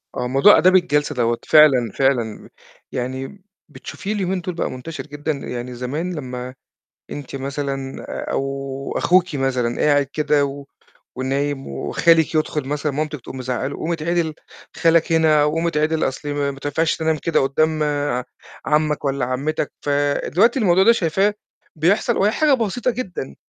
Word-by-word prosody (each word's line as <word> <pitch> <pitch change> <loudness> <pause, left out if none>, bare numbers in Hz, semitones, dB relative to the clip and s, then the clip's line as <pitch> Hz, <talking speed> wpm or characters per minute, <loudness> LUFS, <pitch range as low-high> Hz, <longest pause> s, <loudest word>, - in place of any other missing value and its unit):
آه، 125 - -2
موضوع 135 +11 +6
آداب 185 +3 +5
الجلسة 150 -5 +2
دوّة 120 -1 +1
فعلًا، 135 -7 +5
فعلًا 120 -5 -1 0.4
يعني 130 +9 -5 0.3
بتشوفيه 210 +2 -6
اليومين 190 -2 -1
دُول 180 +1 -4
بقى - - -2
منتشر 145 +6 -7
جدًا؟ 145 +1 -3
يعني 125 -3 -5
زمان 145 +9 -3
لمّا 125 -3 -6 0.6
أنتِ 140 -1 -7
مثلًا 135 0 -4
آآ - - -5
أو 135 0 -3
أخوكِ 180 -3 +2
مثلًا 125 -3 -1
قاعد 145 -1 +3
كده 150 -2 +2
و 140 0 -7 0.5
ونايم 135 +2 -2
وخالِك 160 - +2
يدخُل 150 -3 -1
مثلًا 150 +1 -1
مامتِك 150 0 -3
تقوم 130 - -9
مزعَّقة 130 0 -2
له، 140 - -5
قوم 165 - -3
اتعِدل 165 0 -1 0.4
خالك 165 0 +3
هنا 160 -2 +4
أو 150 0 +2
قوم 165 +2 0
اتعِدل 155 0 +1
أصلِ 135 +2 -5
ما 145 -1 -1
ما 135 - -11
تنفعش 150 +3 0
تنام 160 -1 0
كده 165 +2 +1
قُدّام 155 +3 +1
ع 145 -4 -1 0.4
عَمّك 150 -1 +1
والّا 140 -2 0
عَمِّتك، 140 +4 -2
فدلوقتي 145 - +1
الموضوع 190 -4 +4
ده 230 - +7
شايفاه 195 0 +1 0.4
بيحصل 190 +9 +2
وهي 205 +2 +3
حاجة 305 +2 +3
بسيطة 245 0 0
جدًا، 190 - -6
150 Hz, 155 wpm, -21 LUFS, 135-165 Hz, 0.6 s, ده